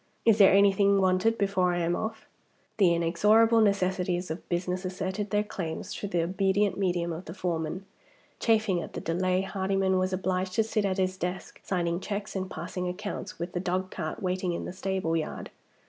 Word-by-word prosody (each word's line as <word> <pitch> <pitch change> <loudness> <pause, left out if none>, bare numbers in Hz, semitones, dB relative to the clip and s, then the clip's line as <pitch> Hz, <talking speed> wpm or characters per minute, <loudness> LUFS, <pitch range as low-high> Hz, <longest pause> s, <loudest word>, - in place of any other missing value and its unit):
Is 225 -2 +5
there 195 - +8
anything 200 0 +5
wanted 190 +4 +2
before 195 -3 +1
I 175 - -1
am 170 0 +1
off?" 220 +2 -4 0.5
The 190 -5 +5
inexorable 210 +7 +4
necessities 185 -4 +1
of 160 - -7
business 180 +1 -1
asserted 190 +2 -3
their 205 +1 +1
claims 175 -6 -5
through 205 - -5
the 175 -3 +1
obedient 190 +2 +1
medium 175 -3 0
of 170 +3 -7
the 165 - -8
foreman. 175 0 -3 0.5
Chafing 220 -6 +2
at - - -8
the - - -4
delay, 185 +2 0
Hardyman 190 -1 0
was 185 0 0
obliged 185 0 -1
to 225 - +3
sit 215 -1 -1
at 190 -1 0
his 185 0 0
desk, 180 +1 -5
signing 170 -2 -1
checks 200 +1 -5
and 190 -1 -3
passing 180 +2 -4
accounts, 200 +3 -5
with 170 +2 -4
the 175 - -1
dogcart 185 -2 -3
waiting 185 -1 -1
in - - -4
the - - -6
stable 190 -3 -1
yard. 160 -2 -4
185 Hz, 180 wpm, -28 LUFS, 180-200 Hz, 0.5 s, there